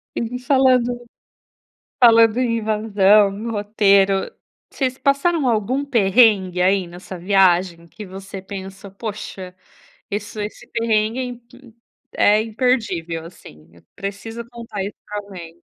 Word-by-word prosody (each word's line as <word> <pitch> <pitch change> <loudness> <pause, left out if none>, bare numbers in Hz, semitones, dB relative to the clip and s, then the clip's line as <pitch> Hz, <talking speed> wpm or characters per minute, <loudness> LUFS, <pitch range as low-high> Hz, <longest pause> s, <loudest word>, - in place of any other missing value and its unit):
E - - -2
vi 245 +2 -4
falando 250 -2 +2 0.9
falando 230 -3 +6
em 235 -2 +1
invasão, 210 0 +2
roteiro, 200 -2 +2 0.4
vocês 260 -2 -2
passaram 280 +1 +1
algum 235 +4 0
perrengue 205 -7 +3
aí 190 0 +2
nessa 180 +2 -10
viagem 180 -2 +2
que 210 - -10
você 195 +1 -9
pensa: 195 0 -9
"Poxa, 195 -3 -7 0.6
esse 205 +1 -4
esse 210 - -8
perrengue 225 +1 0
é - - -1
imp 245 -1 -11 0.4
é 210 +1 +4
imperdível, 220 -8 -1
assim, 80 - -15
eu 85 - -21
preciso 200 +4 -6
contar 230 -4 -7
isso 200 +2 -7
pra 210 - -6
alguém". 175 -5 -11
210 Hz, 120 wpm, -20 LUFS, 190-235 Hz, 0.9 s, falando